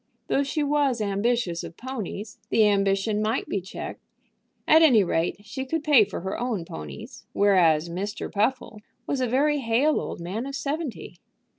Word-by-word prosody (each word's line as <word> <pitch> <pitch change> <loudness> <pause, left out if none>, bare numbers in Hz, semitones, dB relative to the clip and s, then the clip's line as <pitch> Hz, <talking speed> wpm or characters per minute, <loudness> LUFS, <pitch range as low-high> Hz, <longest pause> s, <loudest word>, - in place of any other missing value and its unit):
Though 275 - +2
she 280 +2 -1
was 285 -4 +1
ambitious 200 -3 0
of 170 - -9
ponies, 220 -4 -6
the 220 - +4
ambition 200 +1 +1
might 220 +4 -1
be 200 - -2
checked. 190 - -7 0.7
At 315 +1 +7
any 250 -10 +6
rate, 170 -1 0
she 265 +4 -5
could 305 +4 -3
pay 285 -9 +6
for 195 - -6
her 190 +2 -4
own 230 -8 -2
ponies, 75 - -9
whereas 175 -6 +4
Mr. 195 +5 -4
Puffle 215 0 -1 0.2
was 275 - -1
a 255 - +1
very 290 +5 +2
hale 260 +5 +2
old - - -6
man 195 +9 -4
of 275 - -5
seventy. 285 -1 -4
220 Hz, 165 wpm, -25 LUFS, 195-270 Hz, 0.7 s, At